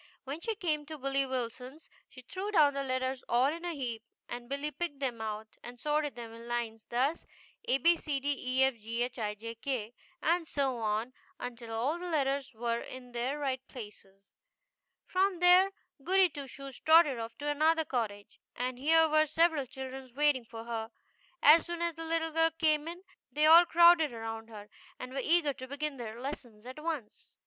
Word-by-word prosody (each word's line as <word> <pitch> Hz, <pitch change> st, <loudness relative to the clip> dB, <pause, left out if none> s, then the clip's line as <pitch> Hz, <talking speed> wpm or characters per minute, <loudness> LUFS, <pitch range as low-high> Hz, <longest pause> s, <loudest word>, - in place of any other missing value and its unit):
When 285 Hz, +4 st, -6 dB
she 450 Hz, +2 st, -2 dB
came 315 Hz, -7 st, -1 dB
to 310 Hz, 0 st, -7 dB
Billy 275 Hz, 0 st, 0 dB
Wilson's 255 Hz, +4 st, -5 dB, 0.2 s
she 255 Hz, -, -13 dB
threw 385 Hz, +10 st, -5 dB
down 305 Hz, -8 st, +5 dB
the 275 Hz, -, -2 dB
letters 260 Hz, 0 st, -2 dB
all 240 Hz, +2 st, +4 dB
in 335 Hz, +1 st, -8 dB
a 345 Hz, -2 st, -3 dB
heap, 240 Hz, -5 st, -4 dB, 0.3 s
and 240 Hz, 0 st, -7 dB
Billy 280 Hz, +2 st, -2 dB
picked 300 Hz, 0 st, -4 dB
them 250 Hz, -5 st, -3 dB
out 215 Hz, 0 st, -4 dB, 0.2 s
and 240 Hz, 0 st, -10 dB
sorted 295 Hz, +1 st, 0 dB
them 230 Hz, -1 st, -8 dB
in 230 Hz, +1 st, -11 dB
lines, 230 Hz, -2 st, -3 dB
thus: 265 Hz, +7 st, 0 dB, 0.4 s
ABCDEFGHIJK, 280 Hz, -3 st, +1 dB
abed 255 Hz, -4 st, -1 dB, 0.3 s
efghij 225 Hz, 0 st, -5 dB
k, 245 Hz, -5 st, -3 dB, 0.3 s
and 335 Hz, 0 st, +1 dB
so 270 Hz, -4 st, 0 dB
on 220 Hz, +3 st, -1 dB, 0.3 s
until 240 Hz, -2 st, -7 dB
all 255 Hz, +9 st, -1 dB
the 360 Hz, 0 st, -5 dB
letters 275 Hz, -4 st, 0 dB
were 235 Hz, +1 st, -1 dB
in 250 Hz, -1 st, -10 dB
their 245 Hz, +4 st, -2 dB
right 265 Hz, -3 st, -2 dB
places. 200 Hz, -4 st, -11 dB, 0.8 s
From 375 Hz, 0 st, +1 dB
there 360 Hz, +2 st, +6 dB, 0.3 s
Goody 375 Hz, +2 st, +4 dB
Two 285 Hz, -2 st, -7 dB
Shoes 275 Hz, -1 st, -9 dB
trotted 315 Hz, -5 st, +5 dB
off 225 Hz, 0 st, -6 dB
to 290 Hz, -, -5 dB
another 315 Hz, +2 st, +2 dB
cottage, 215 Hz, -7 st, -4 dB, 0.2 s
and 250 Hz, 0 st, -3 dB
here 320 Hz, +3 st, +5 dB
were 310 Hz, 0 st, +3 dB
several 315 Hz, -3 st, +2 dB
children 265 Hz, +1 st, -8 dB
waiting 290 Hz, -4 st, +2 dB
for 225 Hz, 0 st, -9 dB
her. 225 Hz, -1 st, -4 dB, 0.5 s
As 310 Hz, +4 st, +7 dB
soon 345 Hz, 0 st, -3 dB
as 340 Hz, 0 st, 0 dB
the 325 Hz, +1 st, -6 dB
little 325 Hz, 0 st, -1 dB
girl 325 Hz, +1 st, +3 dB
came 310 Hz, -1 st, +2 dB
in 350 Hz, +2 st, -7 dB, 0.3 s
they 300 Hz, +1 st, +2 dB
all 330 Hz, +3 st, +9 dB
crowded 340 Hz, -3 st, +6 dB
around 225 Hz, 0 st, -6 dB
her, 210 Hz, -2 st, -10 dB, 0.3 s
and 255 Hz, 0 st, -8 dB
were 270 Hz, -, -1 dB
eager 320 Hz, -1 st, +3 dB
to 260 Hz, 0 st, -9 dB
begin 285 Hz, +1 st, -4 dB
their 230 Hz, -1 st, -7 dB
lessons 245 Hz, -5 st, -7 dB
at 255 Hz, +4 st, -8 dB
once. 305 Hz, -10 st, -5 dB
270 Hz, 180 wpm, -31 LUFS, 240-315 Hz, 0.8 s, all